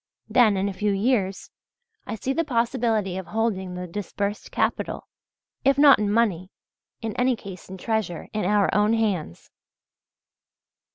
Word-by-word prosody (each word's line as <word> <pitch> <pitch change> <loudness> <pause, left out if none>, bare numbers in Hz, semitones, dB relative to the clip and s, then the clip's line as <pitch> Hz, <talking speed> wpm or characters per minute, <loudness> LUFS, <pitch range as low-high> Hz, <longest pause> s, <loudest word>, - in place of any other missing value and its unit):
Then 220 -5 +4
in 190 +1 0
a 200 - -3
few 210 +2 0
years 195 -2 0 0.6
I 215 - -3
see 260 +5 -2
the 330 - +1
possibility 230 - 0
of 185 - -8
holding 190 -3 -1
the 180 0 -5
disbursed 200 +3 -4
capital, - - -1 0.6
if 275 0 +3
not 285 -4 +7
in 205 -1 0
money, 200 -5 +1 0.5
in 220 -1 -3
any 250 0 +2
case 195 -5 -10
in 190 - -7
treasure, 215 -4 -2
in 215 - -1
our 205 +2 +2
own 210 +2 +3
hands. 200 - -2
210 Hz, 150 wpm, -24 LUFS, 190-230 Hz, 0.6 s, not